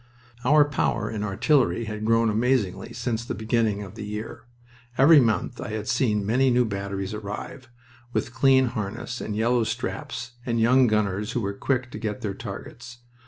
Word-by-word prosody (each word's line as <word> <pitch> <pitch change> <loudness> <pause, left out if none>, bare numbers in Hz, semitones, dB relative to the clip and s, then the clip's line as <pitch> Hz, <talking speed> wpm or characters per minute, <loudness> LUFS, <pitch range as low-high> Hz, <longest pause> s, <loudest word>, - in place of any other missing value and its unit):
Our 145 +3 +5
power 120 -6 -1
in 105 -2 -3
artillery 115 +4 +2
had 105 0 -5
grown 115 0 +3
amazingly 115 -3 0
since 115 -1 -3
the - - -4
beginning 110 -2 0
of 95 -1 -10
the 110 - -7
year. 105 +1 -6 0.5
Every 145 +3 +8
month 120 0 0
I - - -5
had 110 -1 -4
seen 105 -5 +1
many 130 +5 +3
new 125 0 +3
batteries 100 -1 -4
arrive, 105 +5 -7 0.4
with 120 0 -2
clean 130 0 +4
harness 110 +3 -5
and 105 - -4
yellow 115 +2 +2
straps, 120 +2 -4
and 115 -2 -1
young 125 +3 +5
gunners 105 0 0
who 120 - -1
were 100 -1 -2
quick 125 +3 -1
to - - -7
get 105 -3 -4
their 100 -3 -2
targets. 115 +4 -9
115 Hz, 170 wpm, -25 LUFS, 105-125 Hz, 0.5 s, Every